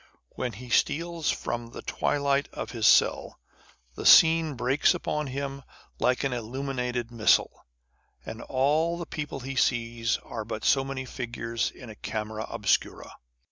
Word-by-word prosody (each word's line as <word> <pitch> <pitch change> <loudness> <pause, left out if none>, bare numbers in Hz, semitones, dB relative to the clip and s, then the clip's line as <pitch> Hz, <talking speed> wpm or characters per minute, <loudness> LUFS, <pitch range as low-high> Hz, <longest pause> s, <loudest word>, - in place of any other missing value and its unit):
When 125 -2 -4
he 120 +4 -10
steals 165 +4 +1
from 120 0 -3
the 115 - -10
twilight 140 -1 0
of - - -5
his 115 -3 +1
cell, - - +3 0.5
the - - -7
scene 160 -2 +6
breaks 125 +4 +2
upon 150 -1 -2
him 140 +1 -4 0.4
like 125 +2 +1
an 135 -2 0
illuminated 125 0 -3
missal, 110 - +2 0.6
and - - -7
all 155 +6 +1
the 170 - -5
people 150 -4 -5
he 135 +2 -5
sees 115 -2 +1
are 115 - -6
but 110 0 -6
so 135 - +4
many 135 -1 -5
figures 115 -2 -3
in 120 -4 -11
a - - -11
camera 110 +1 -5
obscura. 105 -4 -1
130 Hz, 145 wpm, -27 LUFS, 115-140 Hz, 0.6 s, scene